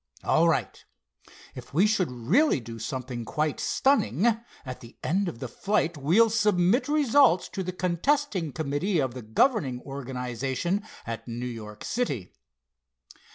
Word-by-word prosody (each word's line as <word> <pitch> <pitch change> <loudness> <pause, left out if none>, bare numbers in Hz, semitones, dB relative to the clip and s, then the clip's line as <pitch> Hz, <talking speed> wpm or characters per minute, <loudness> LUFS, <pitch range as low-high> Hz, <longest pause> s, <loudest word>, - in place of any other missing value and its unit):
All - - +4
right. - - -1 0.7
If - - -11
we 185 +6 +5
should 210 -4 +1
really 150 - +2
do 115 -1 -9
something 125 +1 -4
quite 150 +5 -1
stunning, 225 - +2 0.4
at 130 -1 -6
the 115 - -14
end 190 +3 +1
of 120 - -8
the 130 - -5
flight 170 - 0
we'll 175 +11 +4
submit 210 +2 +2
results 285 - +4
to 195 - -4
the 185 0 -3
contesting 185 - 0
committee 155 +7 -1
of 130 -5 0
the 125 - -7
governing 130 - +1
organization 135 - -3 0.2
at 115 +1 -6
New 120 +1 -4
York 110 -3 -7
City." 140 - -2
155 Hz, 140 wpm, -27 LUFS, 125-205 Hz, 0.7 s, we